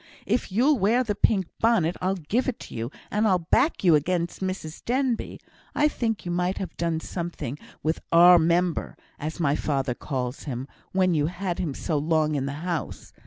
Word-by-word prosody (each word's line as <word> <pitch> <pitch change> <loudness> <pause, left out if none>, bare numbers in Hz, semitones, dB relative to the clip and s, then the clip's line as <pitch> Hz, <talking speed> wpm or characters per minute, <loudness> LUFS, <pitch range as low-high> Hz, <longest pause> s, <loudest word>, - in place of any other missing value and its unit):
If 225 -1 0
you'll 255 +7 +3
wear 225 +6 +3
the 220 -4 -1
pink 200 -1 +2
bonnet 220 -8 +3
I'll 185 +1 +1
give 195 - -1
it 260 - -4
you, 115 +1 -4 0.2
and 215 +2 +2
I'll 185 -3 +4
back 180 - +1
you 175 -3 +6
against 170 +3 0
Mrs 185 -4 -4
Denbigh. 255 -1 -1 0.4
I 300 - +4
think 225 -9 -2
you 175 - -2
might 180 +2 0
have 185 -4 -5
done 165 -1 -1
something 165 -6 -5 0.2
with 160 +1 0
'our 175 +1 +8
member,' 170 +1 +1 0.2
as 155 +2 -5
my 145 -3 +2
father 135 -4 -1
calls 125 0 -4
him, 130 -2 -4 0.2
when 185 -1 +2
you 150 -2 +2
had 180 +1 -3
him 160 -7 -2
so 155 -4 -1
long 155 0 +1
in 140 -2 -1
the 140 - -3
house. 170 -5 -4
175 Hz, 185 wpm, -25 LUFS, 155-195 Hz, 0.4 s, our